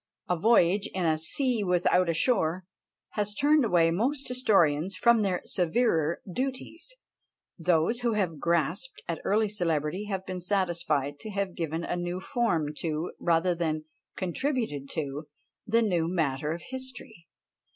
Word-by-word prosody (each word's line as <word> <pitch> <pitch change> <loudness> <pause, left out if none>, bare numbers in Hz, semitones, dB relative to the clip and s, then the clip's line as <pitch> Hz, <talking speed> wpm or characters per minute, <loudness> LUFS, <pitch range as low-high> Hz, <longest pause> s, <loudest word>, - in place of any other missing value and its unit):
a 180 - +1
voyage 195 0 +3
in 185 -2 0
"a 155 -1 +2
sea 240 - +1
without 180 -1 +2
a - - +2
shore!" 185 -4 +1 0.4
has 205 -1 -2
turned 295 +4 +4
away 175 -7 +3
most 260 - -1
historians 195 - +2
from 235 -2 +4
their 190 -3 0
severer 170 -3 +1
duties; 270 - -4 0.6
those 170 +7 +2
who 240 -2 0
have 180 -8 -1
grasped 170 - -1
at 170 -2 -3
early 215 +2 +2
celebrity 175 -2 -1
have 190 -2 -4
been 185 -1 -5
satisfied 170 -7 0
to 215 - -7
have 200 -2 -2
given 165 0 -3
a 175 - -2
new 175 +1 -3
form 170 -9 0
to, 160 +1 -3
rather 170 +1 +2
than 155 -2 -2 0.3
contributed 185 - -2
to 145 -1 -4 0.4
the 230 +2 +3
new 175 -6 +1
matter 150 -4 -1
of 170 +1 -5
history. 255 -9 -8
180 Hz, 145 wpm, -28 LUFS, 160-220 Hz, 0.6 s, turned